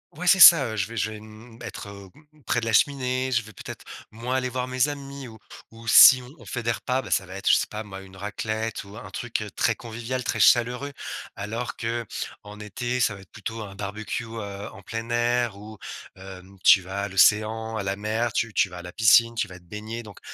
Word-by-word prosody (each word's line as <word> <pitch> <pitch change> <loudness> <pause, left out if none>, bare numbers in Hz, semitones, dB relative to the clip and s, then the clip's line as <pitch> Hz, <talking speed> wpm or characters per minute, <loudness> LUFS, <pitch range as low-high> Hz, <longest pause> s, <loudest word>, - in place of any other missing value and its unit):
ouais 180 +3 -6
c'est 190 +2 +5
ça, 155 -6 +10
heu, - - -5
je 100 +1 0
vais 115 - -9
je 110 0 -1
vais, 105 - -8
mmh, 110 +2 -14
être, 100 -2 -7
heu, 100 -1 -11 0.4
près - - 0
de - - -4
la 115 - -1
cheminée, 130 +1 +1
je 115 - +2
vais 110 0 -13
peut-être - - -10 0.3
moins 120 +4 -4
aller 130 -1 0
voir 125 0 -3
mes 130 +2 +2
amis 140 -2 -7
ou 110 -1 -12 0.3
ou 115 +1 -14
si 130 +2 +9 0.2
on - - -14
fait 125 -2 -5
des 115 - +1
repas, 130 +3 -1
bah, - - -10
ça 95 - +1
va 95 +2 -10
être, 100 - -1
je - - +7
sais - - 0
pas 110 +1 -5
moi, 95 -2 -9
une 95 0 -14
raclette 110 +2 -4
ou 100 +2 -13
un - - -9
truc, 120 -3 -3
heu, 105 -2 -6
très - - +1
convivial, 120 +2 -5
très - - -2
chaleureux, 125 +4 +3 0.4
alors 115 +4 -4
qu'en 115 -2 -6
été, 120 +5 -3
ça 105 -3 +2
va 95 - -12
être 95 - -19
plutôt 115 -1 -6
un 100 -1 -10
barbecue, 105 +4 -5
heu, 105 -3 -7
en 100 - -13
plein 115 +3 -6
air 120 -2 0
ou, 105 +1 -11 0.4
heu, 95 -1 -10 0.2
tu 95 - +7
vas 95 +2 -5
à 100 - -3
l'océan, 110 +3 +3
à 105 - -2
la 95 +1 -2
mer, 110 +3 -1
tu 115 0 -1
tu 95 - +2
vas 90 - -10
à - - -7
la 90 0 -10
piscine, 115 +1 +5
tu 115 - -1
vas 90 -1 -11
te 90 - -25
baigner. 110 +5 -7
Donc, 105 -3 -13
110 Hz, 240 wpm, -25 LUFS, 100-120 Hz, 0.4 s, ça